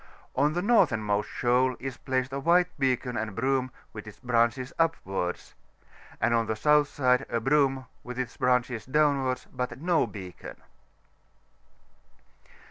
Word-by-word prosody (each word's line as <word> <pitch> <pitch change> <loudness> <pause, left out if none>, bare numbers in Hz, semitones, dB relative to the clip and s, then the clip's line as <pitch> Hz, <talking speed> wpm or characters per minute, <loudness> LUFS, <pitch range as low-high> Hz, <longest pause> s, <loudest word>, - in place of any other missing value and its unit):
On 145 +3 +2
the 175 +2 -1
northernmost 110 - +2
shoal 125 +1 +1
is 130 0 -5
placed 130 0 -2
a 140 - -2
white 175 +5 +3
beacon 130 -2 0
and 110 -3 -3
broom, 130 +1 0 0.2
with 105 0 -8
ks 90 -5 -15
branehes 120 +1 0
upwards; 95 - -1 0.7
and 110 +2 +2
on 115 -1 +1
the 110 - -1
south 150 +4 +4
side 130 -2 +2
a 115 - 0
broom, 135 +1 +2 0.2
with 125 0 -7
its 125 -2 -4
branches 125 -3 0
downwi»rds, 140 -2 +1
but 125 0 -4
no 170 0 +2
beacon. 95 -4 -9
130 Hz, 135 wpm, -27 LUFS, 115-140 Hz, 0.7 s, south